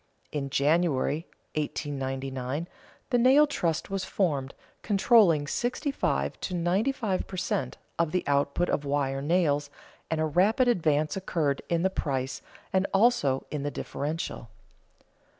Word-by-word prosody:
In 140 -2 -3
January, 150 +1 +1 0.3
1899, 135 -1 -3 0.4
the 245 - +4
nail 265 +5 +6
trust 175 - -2
was 195 -1 -1
formed, 145 -9 -1 0.3
controlling 195 -7 +4
sixty 250 - -1
five - - -1
to 185 - -3
ninety 180 +9 +1
five 215 -8 -2
per 185 - -7
cent. 140 -8 -2 0.2
of 165 -2 +2
the 180 - 0
output 140 +4 +1
of 145 - 0
wire 140 -1 -1
nails, 145 -2 +1 0.4
and 160 - -1
a 160 - +2
rapid 200 - +3
advance 155 -9 +2
occurred 160 -7 -1
in 170 0 +1
the 190 - +2
price 135 -7 -2 0.3
and 190 +1 +2
also 195 - +3
in 150 - -2
the 145 - -1
differential. 145 -4 -4
160 Hz, 135 wpm, -28 LUFS, 140-190 Hz, 0.4 s, nail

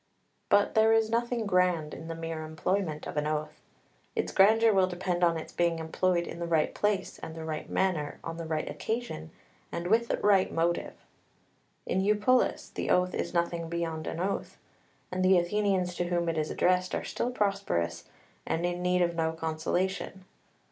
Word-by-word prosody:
But 205 0 +4
there 220 0 +5
is 225 -1 +2
nothing 235 0 0
grand 180 -5 +2
in 160 - -8
the 165 - -4
mere 165 -1 -4
employment 160 0 -2
of - - -6
an 150 0 +1
oath. 155 0 -3 0.5
Its - - -1
grandeur 220 +3 +5
will 190 -1 +4
depend 180 0 -2
on 170 -1 +4
its 160 - -8
being 170 -1 +1
employed 170 +2 0
in - - -7
the 170 - -3
right 160 -2 +2
place 205 -2 -1
and 160 - -7
the 160 -1 -6
right 155 -1 -4
manner, 170 -6 0
on 165 0 -5
the 165 -1 -5
right 160 -1 -2
occasion, 220 - -4 0.4
and 170 - -4
with 225 +5 +3
the - - 0
right 195 -2 +3
motive. 170 +1 0 0.9
In 190 - 0
Eupolis 210 +5 +2
the - - -3
oath 180 0 +3
is - - -2
nothing 170 -1 -1
beyond 165 -2 -3
an 165 - -4
oath; 190 +3 -2 0.5
and 185 0 -1
the 185 0 +6
Athenians 185 0 +1
to 175 - 0
whom 175 -1 0
it 165 - -1
is 155 - -1
addressed 185 0 +1
are - - -2
still 245 - -2
prosperous, 195 - -1 0.4
and 165 +2 -1
in 175 0 -2
need 180 0 +2
of 170 0 0
no 160 -1 0
consolation. 175 +4 -2
175 Hz, 180 wpm, -29 LUFS, 165-195 Hz, 0.9 s, the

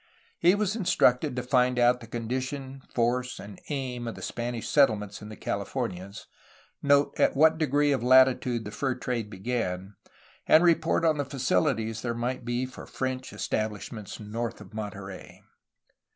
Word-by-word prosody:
He 175 +3 +5
was 205 0 0
instructed 155 - +2
to 125 - -2
find 125 0 +2
out 120 0 +4
the 115 - -11
condition, 130 +4 -4
force, 125 +1 0
and 100 -1 -10
aim 130 -4 -3
of 115 - -4
the - - -9
Spanish 120 -1 -4
settlements 105 -8 +2
in 105 - -9
the 110 - -8
Californias, 100 -3 -4 0.6
note 140 0 +3
at - - +3
what 160 +3 +5
degree 145 -1 +2
of 135 - +1
latitude 125 -2 +4
the 105 - -6
fur 130 +4 -1
trade 120 -4 -3
began, 95 -3 -3 0.5
and 160 - +7
report 165 -1 +3
on 155 -2 +3
the - - +2
faciUties 125 -4 0
there 120 -1 -2
might 120 +2 -2
be 120 +2 -1
for 130 - -10
French 130 -1 -3
estabHshments 110 -1 -4
north 110 +2 -4
of - - -13
Monterey. 100 -3 -7
125 Hz, 155 wpm, -27 LUFS, 110-135 Hz, 0.6 s, and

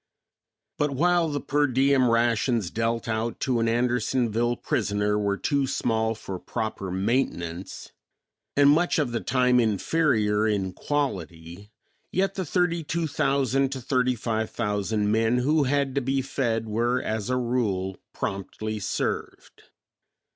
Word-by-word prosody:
But 150 - +2
while 170 +4 +2
the 145 -1 -2
per 145 +1 +1
diem 130 0 +3
rations 115 -3 +1
dealt 115 +1 -1
out 115 +1 -2
to 125 -3 +1
an 115 - +1
Andersonville 120 0 +1
prisoner 105 -2 0
were 100 -1 0
too 140 +2 0
small 110 -2 0
for 95 -4 -7
proper 110 -3 -4
maintenance, 95 -3 -2 0.7
and 145 0 +7
much 175 +4 +2
of 145 -6 0
the 115 - -1
time 125 0 +2
inferior 110 - +2
in 95 -3 -1
quality, 95 - -4 0.4
yet 195 +1 +1
the 190 -2 -3
thirty 170 +1 0
two 165 +2 -2
thousand 135 -2 +1
to 135 - -5
thirty 125 0 +1
five 110 -1 -2
thousand 105 -1 -1
men 115 +2 +2
who 145 +4 +2
had 140 0 +1
to 140 - 0
be 135 +1 0
fed 115 -4 -1
were 120 +4 +1
as 110 -1 -3
a 125 - +1
rule 105 -7 -1
promptly 105 +2 -4
served. 100 - -4
120 Hz, 140 wpm, -26 LUFS, 105-135 Hz, 0.7 s, and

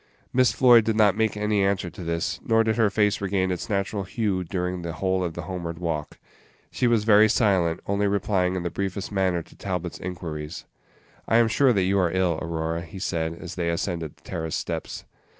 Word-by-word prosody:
Miss 130 0 +4
Floyd 120 -3 +6
did 110 0 0
not 105 -3 +4
make 110 -1 0
any 105 -1 +1
answer 95 -3 0
to 95 - -9
this, 85 0 -2
nor 115 0 +3
did 110 -1 +1
her 110 -3 +3
face 105 0 +1
regain 95 -1 0
its 90 - -4
natural 100 0 -1
hue 95 -2 -1
during 90 0 -3
the 85 -1 -4
whole 95 0 0
of 85 -2 -3
the 85 - -5
homeward 85 -1 -5
walk. 80 -4 -3 0.5
She 125 - +1
was 115 -3 +3
very 105 0 +6
silent, 95 -7 +2
only 100 +1 +1
replying 95 -2 +1
in 90 - -2
the 85 - -3
briefest 100 +1 -3
manner 95 -4 0
to - - -19
Talbot's 90 -3 -4
inquiries. 85 -3 -6 0.6
"I 115 - +4
am 115 -1 +5
sure 130 +3 +3
that 100 -3 +2
you 95 +2 +2
are 90 -2 +2
ill, 90 -3 +1
Aurora," 80 0 -2
he 85 +3 -10
said, 85 -3 -2
as 90 +1 -8
they 85 -2 -2
ascended 85 -3 -3
the - - -28
terrace 80 -1 -4
steps. - - -4
95 Hz, 205 wpm, -25 LUFS, 85-105 Hz, 0.6 s, Floyd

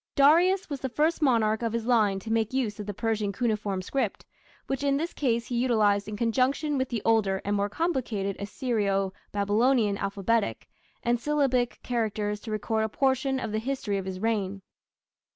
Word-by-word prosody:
Darius 345 +7 +5
was 285 -3 -4
the 265 - -3
first 310 +6 +1
monarch 225 -6 +2
of 230 -1 -1
his 230 -1 -2
line 215 -5 +3
to 220 +3 -3
make 225 +1 0
use 230 -6 -1
of 210 - -6
the 205 - -3
Persian 215 -2 -1
cuneiform 210 -4 -1
script, 270 +8 -2 0.4
which 270 0 -3
in 280 -1 +2
this 330 +4 -3
case 235 -4 0
he 245 - -4
utilized 210 -5 +2
in 210 -1 -5
conjunction 260 +6 +1
with 260 -1 -1
the 230 -3 -3
older 210 -4 +2
and 205 +1 0
more 200 0 0
complicated 225 - -1
Assyro 200 -3 -1 0.2
Babylonian 210 +1 +2
alphabetic 200 +2 -1 0.4
and 240 0 +1
syllabic 260 -3 +1
characters 215 -3 -1
to 225 - -9
record 220 +1 -1
a 220 - -1
portion 265 +2 +1
of 225 - -4
the 215 - 0
history 225 -5 -2
of 190 - -6
his 190 -1 -5
reign. 200 -3 -1
225 Hz, 180 wpm, -27 LUFS, 205-260 Hz, 0.4 s, Darius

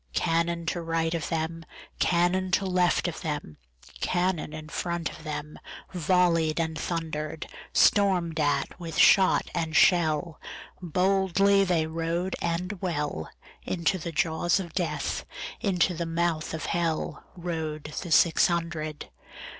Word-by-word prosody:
Cannon 170 - 0
to 170 +1 -2
right 165 0 -1
of 165 -2 -3
them, 165 0 -2 0.4
Cannon 180 +2 +2
to 195 - +3
left 180 -1 +2
of 170 - -5
them, 145 - -4 0.4
Cannon 180 -3 0
in 155 0 -8
front 170 0 -2
of - - -11
themVolley'd 160 +2 -1
and 160 -1 -1
thunder'd; 160 -2 -3 0.3
Storm'd 180 -6 +3
at 145 +4 0
with 165 -2 -6
shot 190 -1 +5
and 160 -1 -2
shell, 165 -2 +3 0.4
Boldly 195 +3 +3
they 175 -4 +1
rode 165 +3 -2
and 175 +3 -2
well, 150 - -2 0.3
Into 180 +2 -1
the 170 +1 -5
jaws 165 +1 +1
of 170 -4 -6
Death, 175 -3 -2 0.4
Into 185 -2 +1
the 170 0 -3
mouth 165 -1 -1
of 160 - -5
HellRode 160 -2 -3
the 175 - -7
six 165 +1 +5
hundred. 165 -3 -3
170 Hz, 125 wpm, -27 LUFS, 160-180 Hz, 0.4 s, shot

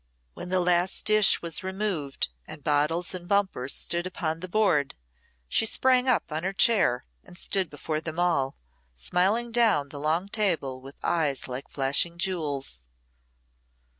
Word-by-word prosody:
When 180 - -6
the 185 0 +2
last 175 +1 +1
dish 215 -3 +5
was 170 +2 0
removed 190 - -2 0.2
and 150 -2 -9
bottles 150 +5 +1
and 175 -1 -7
bumpers 190 -10 +1
stood 175 +1 -2
upon 165 -3 -3
the 185 - -6
board, 175 -9 +1 0.5
she 225 - +3
sprang 255 +2 +2
up 250 -9 +1
on 155 +1 -2
her 190 +1 -2
chair 190 - +3 0.2
and 175 - -12
stood 190 -2 0
before 155 +1 -4
them 160 0 -6
all, 150 -7 +1 0.4
smiling 195 - +1
down 220 -12 +3
the 145 - -8
long 160 +6 0
table 170 - -1
with 135 +2 -11
eyes 150 -5 0
like 130 +1 -6
flashing 140 +5 +1
jewels. 145 - -2
170 Hz, 150 wpm, -26 LUFS, 145-195 Hz, 0.5 s, dish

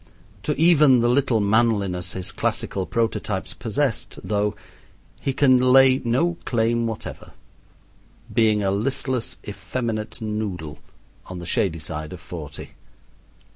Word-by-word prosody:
To 150 - -1
even 150 -7 +6
the 120 - +3
little 125 -2 +2
manliness 100 -4 +1
his 95 -1 -5
classical 95 -2 -2
prototypes 110 -4 -1
possessed, 120 +2 -2
though, 105 -1 0 0.6
he 135 - -1
can 130 -1 +4
lay 130 +1 +6
no 140 +9 +1
claim 115 0 +1
whatever, 110 -2 -7 1.0
being 110 -2 +3
a 95 - +1
listless 125 +3 -2
effeminate 110 +3 -4
noodle, 105 -8 -4 0.5
on 95 - -7
the 85 - -7
shady 85 -1 0
side 75 0 -6
of 90 - -8
forty. 75 -5 -8
110 Hz, 120 wpm, -23 LUFS, 95-125 Hz, 1.0 s, even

